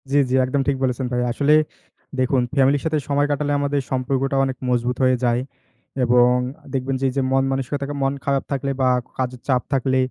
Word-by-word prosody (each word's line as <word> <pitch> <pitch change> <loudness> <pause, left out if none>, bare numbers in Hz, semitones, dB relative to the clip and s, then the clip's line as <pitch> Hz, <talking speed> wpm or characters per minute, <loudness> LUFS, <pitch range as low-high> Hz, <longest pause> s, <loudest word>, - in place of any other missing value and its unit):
জি, - - +1
জি, - - -1
একদম 135 +2 0
ঠিক 140 -1 +1
বলেছেন 130 0 0
ভাই। 125 - +1
আসলে 145 +4 +2 0.7
দেখুন 130 0 +2
ফ্যামিলির 135 0 +3
সাথে 160 -1 +1
সময় 145 +1 +2
কাটালে 145 0 -1
আমাদের 145 0 0
সম্পর্কটা 135 +1 0
অনেক 130 -1 -4
মজবুত 125 0 0
হয়ে 130 0 +4
যায়। 120 0 +2 0.6
এবং 125 0 +4 0.4
দেখবেন 135 0 -1
যে, - - +1
এই - - -6
যে, - - +3
মন 135 0 +3
মানসিকতা 135 +1 -2 0.2
মন 135 0 +1
খারাপ 140 -1 +1
থাকলে 140 0 -1
বা 130 - +3 0.3
কাজের 125 -1 -3
চাপ 130 -3 +2
থাকলে 130 0 +1
135 Hz, 190 wpm, -21 LUFS, 125-140 Hz, 0.7 s, হয়ে